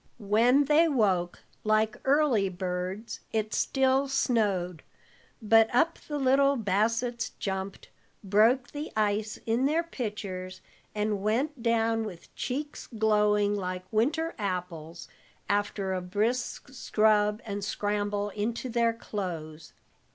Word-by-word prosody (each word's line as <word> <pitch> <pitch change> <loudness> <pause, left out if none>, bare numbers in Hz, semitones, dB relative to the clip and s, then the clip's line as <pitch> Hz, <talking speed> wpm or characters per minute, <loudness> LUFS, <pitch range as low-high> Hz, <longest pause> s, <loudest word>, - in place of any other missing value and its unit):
When 235 +6 +3
they 305 +4 +5
woke, 195 - +1 0.2
like 215 0 +2
early 270 -8 +3
birds, 185 +4 -4
it 215 -1 -1
still 270 +1 +2
snowed, 205 - 0 0.6
but 225 +1 +5
up 330 +7 +2
the 295 - -3
little 275 +1 +3
Bassetts 230 +3 0
jumped, 190 0 -4 0.3
broke 220 +6 +3
the 295 +2 -6
ice 215 0 0
in 230 +3 +1
their 320 +3 +1
pitchers, 200 - -5 0.4
and 210 -1 -1
went 245 +7 -1
down 225 -1 +1
with 185 -6 -9
cheeks 290 +3 -4
glowing 210 -2 +2
like 185 -2 -4
winter 300 +10 +1
apples, 180 -4 -4 0.4
after 200 -1 -1
a 185 - -2
brisk 220 +9 -2
scrub 215 -4 +2
and 205 -2 -4
scramble 205 0 -1
into 225 +5 -3
their 235 -1 +2
clothes. 170 -8 -6
215 Hz, 115 wpm, -28 LUFS, 200-245 Hz, 0.6 s, they